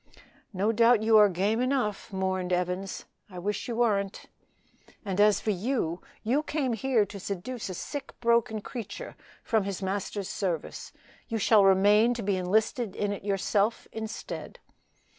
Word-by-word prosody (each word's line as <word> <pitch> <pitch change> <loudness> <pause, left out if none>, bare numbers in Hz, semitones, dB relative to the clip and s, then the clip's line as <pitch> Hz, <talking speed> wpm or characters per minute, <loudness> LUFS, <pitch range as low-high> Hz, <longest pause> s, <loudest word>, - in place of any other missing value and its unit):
"No 200 +2 +1
doubt 230 0 +4
you 220 0 +4
are 210 -1 +7
game 200 +6 0
enough," 250 -7 -1
mourned 190 -1 -1
Evans; 180 +2 -2 0.2
"I 185 - -10
wish 205 +4 -3
you 235 - -3
wern't." 205 -4 0 0.8
"And 195 0 0
as 210 -1 +5
for 215 - -1
you, 195 -4 -1 0.2
you 255 +7 +2
came 295 -5 -1
here 230 -2 +2
to 200 0 -9
seduce 200 +5 -5
a 185 - -5
sick, 280 - -6
broken 235 -2 +2
creature 245 - -7 0.3
from 220 -4 +1
his 195 0 -4
Master's 195 0 -3
service; 180 -5 -3 0.4
you 225 - -2
shall 215 0 +5
remain 205 +5 +5
to 235 - -4
be 200 0 +1
enlisted 210 +4 0
in 205 -1 -1
it 200 - -5
yourself 200 +2 0
instead." 220 0 -6
210 Hz, 155 wpm, -28 LUFS, 190-230 Hz, 0.8 s, are